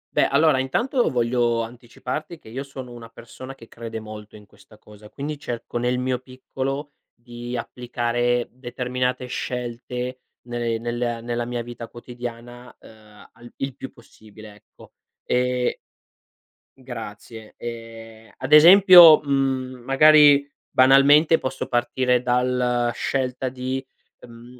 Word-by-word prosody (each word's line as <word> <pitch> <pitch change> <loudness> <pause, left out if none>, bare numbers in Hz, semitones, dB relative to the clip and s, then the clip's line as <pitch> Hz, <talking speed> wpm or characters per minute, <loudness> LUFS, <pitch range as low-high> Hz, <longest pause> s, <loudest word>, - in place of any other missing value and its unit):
Beh, - - +3
allora 140 -1 +3
intanto 240 - 0
voglio 120 -1 0
anticiparti 125 +7 -7
che - - -20
io 120 +5 -6
sono 135 -3 -9
una 115 -1 -11
persona 125 +4 -11
che 115 -3 -15
crede 115 -1 -8
molto 105 -1 -11
in 105 -1 -14
questa 105 +2 -21
cosa, 105 0 -16
quindi 145 +3 -6
cerco, 120 -4 -5
nel 125 +1 0
mio 125 0 -1
piccolo, 135 +2 -6 0.2
di 120 +1 -8
applicare 120 0 -2
determinate 125 0 -3
scelte 125 0 -5 0.3
ne 120 -1 -2
nella 120 0 -3
nella 120 0 -3
mia 120 0 -4
vita 120 -1 -9
quotidiana, 120 0 -10
ehm, 105 -2 -17
al 120 0 -15
il 135 -2 -5
più 135 - -9
possibile, 110 -4 -16
ecco, 105 - -20 0.3
ehm 125 0 0 1.1
Grazie. 115 -3 -10
Ehm, 115 -1 -10
ad 130 +3 -2
esempio, 175 0 +9
mhmm, 135 -3 -2
magari 145 +1 +6 0.2
banalmente 140 +5 +5
posso 130 0 -4
partire 125 0 0
dalla 125 -1 0
scelta 130 0 -2
di, 130 +1 -4 0.4
uhm, 120 +1 -14
125 Hz, 125 wpm, -22 LUFS, 120-130 Hz, 1.1 s, esempio